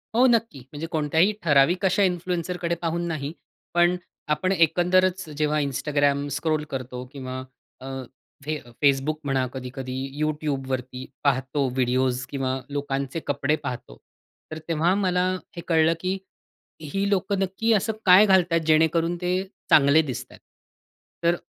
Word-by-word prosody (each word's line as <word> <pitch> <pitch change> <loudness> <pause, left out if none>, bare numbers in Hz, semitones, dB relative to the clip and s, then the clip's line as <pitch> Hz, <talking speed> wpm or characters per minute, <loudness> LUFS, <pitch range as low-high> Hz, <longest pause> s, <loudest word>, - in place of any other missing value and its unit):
हो, 250 +2 +5
नक्की. 230 - +1
म्हणजे 155 +2 -5
कोणत्याही 160 +5 +2
ठराविक 165 +5 +4
अशा 190 +2 +3
इन्फ्लुएन्सरकडे 175 -1 -1
पाहून 170 0 -1
नाही, 150 -3 -3 0.4
पण 175 +1 +4 0.4
आपण 185 +5 -1
एकंदरच 180 +1 +2
जेव्हा 150 0 +1
Instagram 145 0 0
स्क्रॉल 155 0 0
करतो, 125 -1 -5
किंवा 130 -2 -6 0.4
अ, - - -9 0.6
फे 155 0 -1 0.3
Facebook 140 +2 +3
म्हणा, 135 -2 +1
कधी-कधी 130 0 -6 0.3
YouTubeवरती 135 -4 -2 0.2
पाहतो 135 0 +1
व्हिडिओज 130 0 +1
किंवा 135 -1 -2
लोकांचे 140 +1 -3
कपडे 145 +1 +1
पाहतो. 125 - -6 0.5
तर 155 - -4
तेव्हा 165 +2 +2
मला 180 -2 +1 0.3
हे 170 - -5
कळलं, 160 -1 +4
की 185 +2 -1 0.6
ही 195 +7 -2
लोकं 195 0 0
नक्की 195 +4 0
असं 215 +2 +1
काय 190 +3 +8
घालतात, 180 -4 +4
जेणेकरून 160 +2 +3
ते 180 0 0 0.4
चांगले 145 +2 +6
दिसतात. 135 -6 -6 0.9
तर 170 - +4
अ, - - -11
155 Hz, 130 wpm, -25 LUFS, 135-180 Hz, 0.9 s, काय